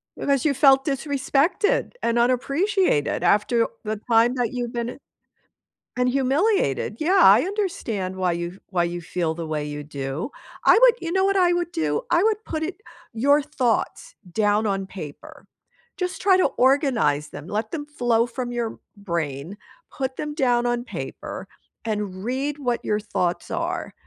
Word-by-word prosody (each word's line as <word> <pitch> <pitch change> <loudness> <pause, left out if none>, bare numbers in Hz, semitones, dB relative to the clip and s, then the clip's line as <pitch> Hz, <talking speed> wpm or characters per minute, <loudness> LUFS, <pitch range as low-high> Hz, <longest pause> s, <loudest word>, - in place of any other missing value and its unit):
Because 280 0 0
you 290 - +3
felt 270 -1 +5
disrespected 285 - +1
and 235 0 +1
unappreciated 265 - +1
after 220 +5 +3 0.2
the 215 -1 -3
time 230 +2 +5
that 245 -1 -1
you've 245 -1 -3
been 235 0 -3 1.0
and 250 0 +2
humiliated, 270 - +1
yeah, 370 +5 +3
I 205 +5 +8
understand 245 - -3
why 185 -2 0
you 170 +2 -4
why 175 -3 +1
you 175 0 -4
feel 160 -1 -2
the 165 -1 -5
way 150 -1 -3
you 145 0 -5
do. 140 - -5 0.3
I 455 - +7
would - - +7
you 335 -1 -4
know 380 +1 +2
what 395 0 +2
I 350 -1 +4
would 345 0 -1
do? 150 -2 -1
I 345 +2 +3
would 435 0 +1
put 315 0 -3
it 370 +5 -5 0.3
your 285 +6 +3
thoughts 295 - -1 0.2
down 210 +2 +2
on 195 -1 -1
paper. 155 -8 -10 0.5
Just 365 -1 -3
try 380 -1 +5
to 370 - +4
organize 245 - +2
them, 145 +1 -9
let 215 +2 -2
them 290 -3 -4
flow 240 -5 +1
from 245 0 -5
your 235 -2 -3 0.2
brain, 170 -3 -4 0.4
put 265 -1 -3
them 300 -1 -4
down 245 -5 +2
on 240 0 0
paper, - - -7 0.4
and 205 -3 -3
read 275 +5 -2
what 245 -4 -2
your 210 0 0
thoughts 180 -4 -2
are, - - -3
240 Hz, 160 wpm, -23 LUFS, 190-295 Hz, 1.0 s, I